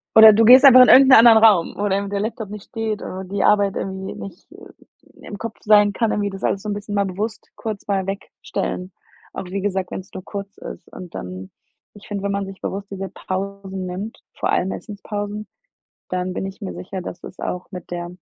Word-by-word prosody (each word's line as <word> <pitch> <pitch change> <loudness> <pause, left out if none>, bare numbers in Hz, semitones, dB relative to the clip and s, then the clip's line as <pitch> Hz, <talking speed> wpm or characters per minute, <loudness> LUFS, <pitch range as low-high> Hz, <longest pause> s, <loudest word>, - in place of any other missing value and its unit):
Oder 220 0 +11
du 225 +1 +4
gehst 255 +4 +9
einfach 255 -1 +10
in - - +4
irgend 270 0 +8
'nen 260 - +9
anderen 225 -1 +8
Raum, 200 -7 +5
wo 205 0 -1
dann 200 +1 -1
der 200 - -1
Laptop 220 -1 -4
nicht 210 -2 -8
steht 220 -2 -3
oder 190 +1 -6
die 195 +2 -2
Arbeit 205 -2 +3
irgendwie 190 0 -5
nicht 190 -3 -10 0.7
im 205 - -8
Kopf 230 -1 -6
sein 210 -1 +5
kann, 225 0 0
irgendwie 205 -1 -1
das 195 0 -9
alles 195 - 0
so 210 - -4
'n - - -1
bisschen 205 0 -5
mal 200 -1 +2
bewusst 205 +3 -5
kurz 215 -3 -6
mal 195 -2 0
wegstellen. 190 -1 -5 0.4
Auch 195 - -6
wie 195 +2 -4
gesagt, 190 -2 -2
wenn's 190 0 -7
nur 185 - -7
kurz 200 -1 -7
ist - - -9
und 180 -2 -10
dann 90 +1 -7 0.4
ich 205 - -14
finde, 200 -1 -4
wenn 200 - -1
man 200 0 -2
sich 195 0 -10
bewusst 195 +1 -5
diese 195 0 -5
Pausen 195 0 -5
nimmt, 190 +5 -6 0.2
vor - - -1
allem 190 - +1
Essenspausen, 205 0 -6 0.6
dann 185 0 -2
bin 190 - -3
ich 195 +3 -8
mir 195 - -5
sicher, 190 0 -7
dass 175 - -8
es - - -12
auch 180 0 -4
mit 180 -1 -9
der 175 0 -4
200 Hz, 215 wpm, -21 LUFS, 190-210 Hz, 0.7 s, Oder